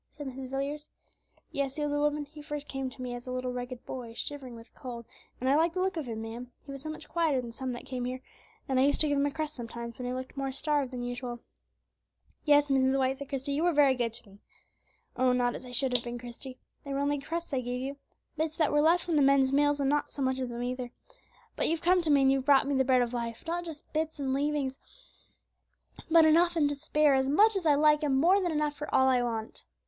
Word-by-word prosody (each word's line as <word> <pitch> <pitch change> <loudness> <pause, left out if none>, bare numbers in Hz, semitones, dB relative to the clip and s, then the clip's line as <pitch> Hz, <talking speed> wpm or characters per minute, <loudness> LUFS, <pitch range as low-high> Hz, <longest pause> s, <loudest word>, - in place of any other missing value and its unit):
said 290 - -9
Mrs. 260 -1 -6
Villiers. 280 +3 -4 0.6
"Yes," 275 -1 -2
said 295 -1 -1
the - - 0
old 295 0 +2
woman, 300 -1 -4
"he 300 +1 -12 0.2
came 270 -2 -4
to 255 0 -11
me 250 -1 -4
first 245 - -6
as - - -19
a - - -4
little 255 0 -3
ragged 245 0 -6
boy, 235 -3 -7
shivering 265 -4 -5
with 230 0 -14
cold; 240 -3 -8 0.3
and 255 - -2
I 270 - +4
liked 330 +3 +2
the - - -1
look 380 0 0
of 315 -5 -4
him, 225 -1 -4
ma'am, 235 +2 -7
he 280 - -8
was 275 -1 -7
so 310 - -6
much 310 0 -7
quieter 320 -6 +1
than 240 -2 -6
some 260 +2 -4
that 240 - -8
came 250 -2 -4
here; 255 +1 -3 0.5
and 265 -1 +1
I - - +5
used 285 - +2
to 310 - +7
give 285 -1 +1
him 285 - +2
a - - -2
crust 310 +1 -3
sometimes, 235 -1 -7
when 250 - -3
he 250 - -2
looked 255 0 -6
more 270 -1 -2
starved 290 -1 0
than 250 -1 -5
usual." 245 0 -5 1.0
"Yes, 290 -1 +5
Mrs. 265 0 +3
White," 265 0 +1
said 280 - -7
Christie, 275 0 -3
"you 290 - 0
were 350 - +3
often 340 - -1
very 285 -2 +6
good 240 -3 -1
to 230 -1 -6
me." 200 0 -17 0.8
"Oh! 255 0 +3
not 245 -1 +1
as 255 - -8
I - - -9
should 250 +1 +2
have 240 - +2
been, 240 0 -5
Christie; 245 +2 -8 0.3
they 280 - -7
were 275 - -1
only 285 0 0
crusts 330 +2 -5
I 260 - +1
gave 250 +1 -3
you, 275 +2 -4 0.4
bits 315 0 -1
that 310 -3 +2
were 295 - +4
left 335 +3 +4
from 335 -3 0
the - - +5
men's 275 -1 +4
meals, 290 +1 +3
and 275 0 +2
not 295 0 0
so 280 - -4
much 260 0 0
of 255 -1 -2
them 240 0 -4
either; 250 0 -3 0.7
but - - +1
you've 330 0 0
come 360 +1 +4
to 330 - -1
me 280 -2 +5
and 265 - +5
you've 270 -1 0
brought 280 -1 +5
me 285 - 0
the 265 -1 +3
Bread 255 -1 +4
of 240 0 -4
Life, 235 -1 -4
not 345 +1 -2
just 320 -3 -10
bits 315 0 -1
and 270 -2 -1
leavings, 280 -1 -1 1.3
but 330 -1 +7
enough 340 +2 +5
and 305 -3 +3
to 290 - -2
spare, 295 +1 +2
as 265 0 +2
much 420 +9 +5
as 365 -4 0
I 295 - +6
like, 300 +1 +4
and 280 -3 +1
more 360 +8 +4
than 350 -2 0
enough 300 -1 0
for 300 - -6
all 265 - +4
I 255 -2 +4
want." 225 -2 -4
275 Hz, 265 wpm, -29 LUFS, 250-295 Hz, 1.3 s, to